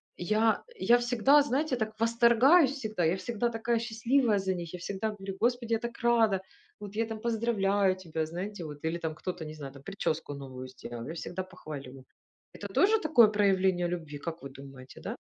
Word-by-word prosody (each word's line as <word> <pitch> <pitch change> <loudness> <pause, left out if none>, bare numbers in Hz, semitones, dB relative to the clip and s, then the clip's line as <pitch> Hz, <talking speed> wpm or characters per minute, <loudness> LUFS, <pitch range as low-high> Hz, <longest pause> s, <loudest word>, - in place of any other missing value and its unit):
Я 215 +5 +1
я 240 - +4
всегда, 245 +4 +4
знаете, 285 +1 0
так 220 -2 -4
восторгаюсь, 235 +7 +5
всегда, 220 -9 -3
я 165 +4 +2
всегда 235 +3 -1
такая 230 0 0
счастливая 235 0 +1
за 190 -1 0
них, 170 -3 -6
я - - -4
всегда 200 +4 -3
говорю: 195 -2 -7
"Господи, 240 0 +1
я 225 - +2
так 235 0 -6
рада, 225 -5 +3 0.4
вот 205 -1 -8
я 225 +1 +1
там 225 -1 -6
поздравляю 205 -4 +1
тебя!" 165 -3 -3
Знаете 180 +3 -5
вот, 150 -1 -8
или 165 +2 -1
там 160 -2 -3
кто-то, 180 0 -5
не 155 0 -7
знаю 140 -3 -8
там, 140 - -13
прическу 165 -4 -3
новую 130 -2 -8
сделал, 120 -2 -8
я 160 - -5
всегда 175 +2 -4
похвалю. 135 -7 -9 0.5
Это - - -7
тоже 435 +3 +3
такое 300 - +6
проявление 190 -4 +2
любви, 160 -4 -5
как 170 +3 -6
вы 140 - -7
думаете, 135 -1 -12
да? - - -5
200 Hz, 190 wpm, -29 LUFS, 165-235 Hz, 0.5 s, такое